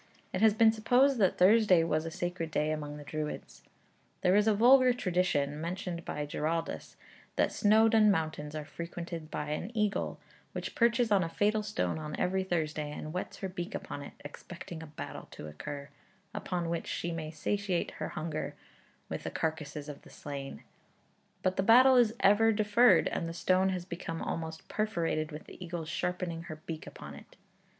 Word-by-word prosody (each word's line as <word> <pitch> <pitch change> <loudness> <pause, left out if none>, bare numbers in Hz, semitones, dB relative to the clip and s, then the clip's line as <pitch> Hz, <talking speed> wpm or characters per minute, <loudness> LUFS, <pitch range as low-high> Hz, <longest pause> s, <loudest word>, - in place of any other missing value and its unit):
It 185 - -1
has 220 -2 +6
been 220 0 +6
supposed 245 +4 +3
that 190 -3 +3
Thursday 190 -2 +6
was 160 0 0
a - - -2
sacred 175 0 -3
day 155 -1 0
among 150 -1 -4
the 145 - -9
Druids. 150 +1 -5 0.6
There 180 +1 +4
is 210 +1 +4
a 220 - +5
vulgar 255 +3 +6
tradition 175 - 0
(mentioned 175 0 -4
by 150 - -3
Giraldus), 160 +3 -3 0.4
that - - +2
Snowdon 220 0 +5
mountains 155 -4 -1
are 155 -1 -4
frequented 170 0 -6
by 150 -1 -4
an 165 +6 -3
eagle, 210 -2 0 0.3
which - - -4
perches 235 -1 +3
on 195 -3 +5
a 165 - -3
fatal 210 +5 +1
stone 205 - -2
on 150 -1 -5
every 190 +1 +1
Thursday 155 -4 -2
and 155 - -6
whets 180 +4 -5
her 195 - -1
beak 175 -2 -5
upon 145 - -5
it, 140 - -9
expecting 170 +2 -8
a 160 - -8
battle 150 - -8
to - - -9
occur, 140 - -7 0.4
upon 180 -5 -2
which 170 - -3
she 170 - -2
may 160 -2 -4
satiate 185 +3 -1
her - - -5
hunger 155 -1 -4 0.5
with - - -4
the - - -4
carcases 155 -2 -3
of 145 -2 -8
the - - -16
slain; 140 - -7 0.8
but 185 0 +1
the - - +3
battle 255 +6 +7
is 230 -2 +4
ever 215 +3 +5
deferred, 215 +3 +5
and 165 - -2
the 165 - -7
stone 185 +2 +2
has 180 -2 -3
become 170 -2 -5
almost 160 -1 -4
perforated 170 -7 -1
with 150 +1 -7
the - - -10
eagle's 170 -2 -5
sharpening 170 0 -2
her 155 -2 -6
beak 160 -1 -6
upon 75 0 -9
it. 70 - -14
170 Hz, 180 wpm, -31 LUFS, 155-205 Hz, 0.8 s, battle